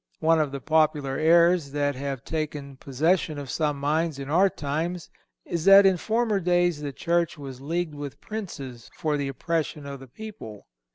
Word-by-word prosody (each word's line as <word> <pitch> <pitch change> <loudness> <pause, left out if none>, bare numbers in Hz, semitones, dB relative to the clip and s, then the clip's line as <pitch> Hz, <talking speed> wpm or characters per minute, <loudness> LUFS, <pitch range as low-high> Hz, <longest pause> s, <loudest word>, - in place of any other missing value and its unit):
One 165 0 +3
of 150 -3 0
the 140 - -4
popular 150 -3 +1
errors 170 -2 +4
that 145 -1 +1
have 135 -2 -5
taken 150 -3 -4
possession 155 +4 0
of 140 -3 -6
some 150 -3 -1
minds 155 +2 0
in 140 +1 -6
our 190 +5 +5
times 165 +3 -3 0.3
is 170 -2 -3
that 195 0 +9
in 190 -1 +5
former 220 +1 0
days 175 -3 +1
the 145 -1 -4
Church 170 +3 0
was 135 -3 -8
leagued 165 +2 -2
with 145 -1 -7
princes 140 - -7
for 155 -2 -1
the 145 -1 -1
oppression 155 +1 -2
of 140 -1 -7
the 135 - -12
people. 125 - -10
155 Hz, 175 wpm, -26 LUFS, 140-170 Hz, 0.3 s, that